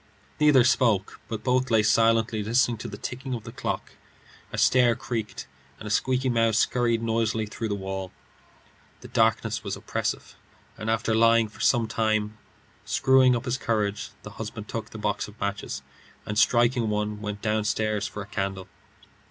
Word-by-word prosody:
Neither 150 -4 +6
spoke, 115 -5 +2
but 110 0 -6 0.2
lay 110 -2 +4
silently 115 0 +3
listening 120 +2 +2
to 110 - -6
the 100 - -7
ticking 130 +3 -5
of 115 - -7
the 115 - -8
clock. 135 +3 -4 0.6
A - - -5
stair 125 -2 +4
creaked, 120 -4 -4 0.3
and - - -11
a - - -4
squeaky 130 +3 +1
mouse 115 -3 +2
scurried 115 -2 +1
noisily 115 -1 0
through 110 +1 -5
the 100 - 0
wall. 95 -1 -5 0.9
The - - -11
darkness - - +1
was - - -3
oppressive, - - -4 0.4
and 110 - -5
after 110 0 +1
lying 115 0 +4
for - - -17
some 120 -3 +3
time 110 -1 0 0.5
screwing 130 -1 +4
up 120 +2 -3
his 125 0 -1
courage, 105 -3 -1 0.3
he 110 - -7
took 110 +1 -6
the - - -9
box 105 -1 -2
of 105 +1 -15
matches, 100 0 -3 0.4
and 105 - -4
striking 120 +1 +3
one, 105 0 -2
went 105 -1 -5
downstairs 110 -1 0
for 105 - -6
a - - -11
candle. 95 -4 -4
110 Hz, 160 wpm, -26 LUFS, 105-120 Hz, 0.9 s, Neither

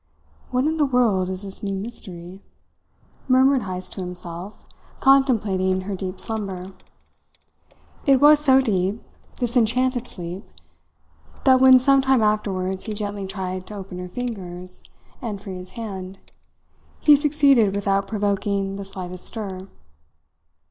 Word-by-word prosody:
"What 255 +2 0
in 315 +1 0
the 300 - +3
world 225 -8 +2
is 190 +1 -4
this 195 -1 -3
new 195 -1 -3
mystery?" 190 -3 -6 0.9
murmured 260 +1 +4
Heyst 185 -2 -4
to - - -6
himself, 180 +2 -7 0.3
contemplating 210 -9 +3
her 195 +1 -4
deep 185 0 -5
slumber. 195 -4 -5 1.3
It 270 -2 +5
was 295 +1 +7
so 270 -3 +5
deep, 200 -3 -1 0.3
this 245 -1 -2
enchanted 250 +1 +1
sleep, 180 +2 -6 1.0
that 260 -1 +5
when 260 -1 +9
some 275 +2 +4
time 265 -3 +3
afterwards 190 -3 -1
he 215 - -4
gently 205 -2 -4
tried 185 -1 -5
to 210 - -8
open 190 -2 -8
her 180 0 -6
fingers 185 -5 -5 0.4
and 215 -5 -4
free 195 -2 -7
his 180 0 -9
hand, 190 -4 -6 0.8
he 295 - +7
succeeded 280 -8 +3
without 195 -1 0
provoking 200 -2 -1
the 200 - -6
slightest 185 -2 -2
stir. 195 -4 -5
200 Hz, 135 wpm, -23 LUFS, 185-250 Hz, 1.3 s, when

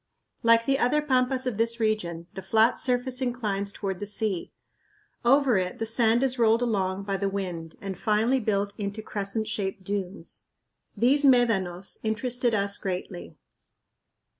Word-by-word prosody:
Like 230 -1 +4
the 270 0 +1
other 255 +5 +2
pampas 260 -2 +1
of 235 -5 -3
this 230 +1 +1
region, 180 -7 -1
the 190 - -6
flat 220 +5 +3
surface 250 0 0
inclines 210 -6 -1
toward 195 -3 -4
the 205 - -4
sea. 205 -3 -1 0.7
Over 260 -2 +4
it 180 -1 -2
the 225 - -2
sand 230 +2 +3
is 255 -2 0
rolled 230 +1 +4
along 195 -4 -1
by 195 -1 -2
the 200 0 -1
wind 180 -5 -5
and 195 -1 -4
finally 220 +7 +1
built 205 -3 -1
into 205 +1 -4
crescent 210 +1 -4
shaped 190 -1 -4
dunes. 190 -3 -6 0.5
These 275 +5 +3
médanos 205 -9 +2
interested 235 +2 0
us 200 0 0
greatly. 180 -1 -5
215 Hz, 150 wpm, -26 LUFS, 195-245 Hz, 0.7 s, Like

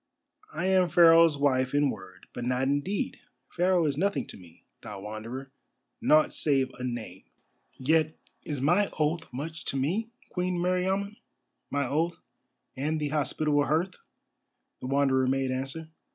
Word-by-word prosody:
"I - - -3
am 185 -2 +3
Pharaoh's 165 -2 +6
wife 130 -2 +1
in 145 -2 +3
word, 95 -2 -11
but 120 - -5
not 125 +1 0
in 140 +2 +1
deed. 195 +5 -3 0.3
Pharaoh 180 -1 +2
is 140 -2 0
nothing 200 +3 0
to - - -7
me, 85 -2 -17 0.2
thou 105 -2 -8
Wanderer—nought 130 +7 -2
save 135 -3 +1
a - - -5
name." 115 -7 -5 0.5
"Yet 155 +3 +1 0.2
is 145 -4 -5
my 175 +8 +3
oath 155 0 -1
much 155 +5 -6
to 135 - -2
me, 185 +12 -1 0.2
Queen 180 0 -1
Meriamun—my 185 -5 -3
oath 160 +5 -1 0.6
and 155 +4 -1
the 150 -1 -1
hospitable 150 0 +1
hearth," 165 +5 0 0.9
the - - -6
Wanderer 135 -1 +2
made 135 0 0
answer. 135 +5 -4
145 Hz, 140 wpm, -28 LUFS, 130-170 Hz, 0.9 s, Pharaoh's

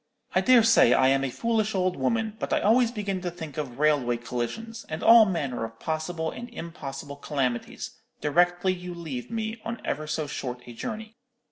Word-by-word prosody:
I - - +4
dare 255 -3 +6
say 225 - +6
I 130 0 +5
am 135 0 +3
a 135 - 0
foolish 220 - 0
old 185 -1 +1
woman, 225 -2 0
but - - -3
I - - +3
always 230 +3 +4
begin 200 -5 -3
to 180 - -2
think 160 -5 -8
of 135 -5 -4
railway 140 -5 +2
collisions, 125 - -4
and 155 - -4
all 230 -1 +9
manner 145 - -2
of 115 0 -7
possible 160 +1 -2
and 240 +1 -8
impossible 140 - -7
calamities, 135 -5 -3 0.2
directly 175 +4 +2
you 180 -1 -7
leave 150 -8 -6
me 225 0 -3
on 230 0 -4
ever 155 +2 -2
so 155 0 -1
short 125 -3 -5
a 120 - -9
journey. 220 - -6
170 Hz, 190 wpm, -27 LUFS, 135-220 Hz, 0.2 s, all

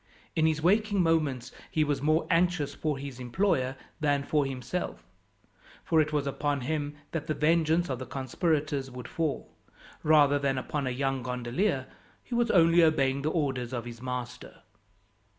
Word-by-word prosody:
In 160 0 +3
his 160 -1 0
waking 205 +1 +3
moments 150 -7 0 0.2
he 155 - +2
was 145 -2 -1
more 155 +3 +2
anxious 165 -4 +2
for 150 0 -2
his 135 -2 -7
employer 130 0 0 0.2
than 145 -2 +1
for 145 -1 +1
himself, 135 +7 -4 0.8
for 160 -2 +3
it 155 0 -1
was 145 -2 0
upon 140 0 -1
him 145 +2 -2 0.2
that 165 -3 -4
the 155 - -1
vengeance 165 +2 +2
of 130 -4 -3
the 130 - -6
conspirators 140 +1 -1
would 125 -1 -8
fall, 160 -4 -3 0.5
rather 145 -2 +5
than 135 -1 0
upon 135 +2 -2
a - - +1
young 135 +1 -1
gondolier, 125 - -1 0.4
who 245 - -4
was 240 -1 +2
only 170 -2 +5
obeying 140 -4 +3
the 150 - 0
orders 135 -6 -1
of 120 -2 -3
his 120 -1 -9
master. 125 -1 -6
145 Hz, 165 wpm, -29 LUFS, 130-160 Hz, 0.8 s, rather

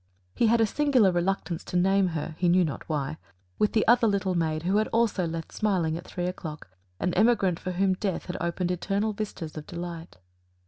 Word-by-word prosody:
He 230 - +2
had 230 +1 +4
a 225 - +5
singular 255 -4 +3
reluctance 175 -1 -1
to 180 - -2
name 195 +1 +3
her 155 +1 -5
he 180 - +3
knew 180 +1 +4
not 150 - -6
why 150 0 -2 0.4
with 210 - +2
the 220 - +2
other 240 0 +5
little 195 -2 +1
maid 160 -2 -1
who 195 +4 +2
also 225 -4 +1
had 170 -2 -1
left 165 0 -5
smiling 185 -7 0
at 175 - -7
three 175 - -3
o'clock, 160 - -6 0.3
an 180 - 0
emigrant 200 -4 +3
for 185 - -4
whom 190 +1 +2
Death 190 0 -3
had 180 - -5
opened 175 +1 -1
eternal 200 +4 -1
vistas 200 -6 -5
of 150 - -7
delight. 170 - -7
180 Hz, 200 wpm, -27 LUFS, 170-205 Hz, 0.4 s, a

